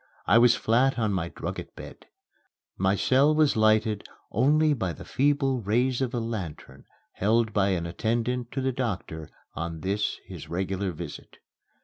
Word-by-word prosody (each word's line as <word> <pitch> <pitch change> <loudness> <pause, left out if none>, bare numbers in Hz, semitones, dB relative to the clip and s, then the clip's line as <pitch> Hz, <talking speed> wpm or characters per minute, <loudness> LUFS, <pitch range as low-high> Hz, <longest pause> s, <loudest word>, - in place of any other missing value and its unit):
I 115 - +5
was 120 0 +6
flat 125 +4 +2
on 110 -3 0
my 85 -3 -2
drugget - - -6
bed. - - -11 0.7
My 95 +1 +1
cell 135 +8 +3
was 155 -2 +3
lighted 110 -1 +2 0.3
only 150 +2 +3
by 95 -10 -2
the - - -11
feeble 135 -2 +1
rays 120 +5 +1
of 130 -2 0
a - - 0
lantern 90 - -6 0.3
held 110 +2 +1
by 100 -2 +2
an 85 - -4
attendant 115 +7 -2
to 135 - -2
the 130 0 0
doctor 95 - -4 0.2
on 80 -1 -5
this 100 +2 -1
his - - -10
regular 95 +2 -2
visit. 85 -2 -9
110 Hz, 155 wpm, -26 LUFS, 95-125 Hz, 0.7 s, was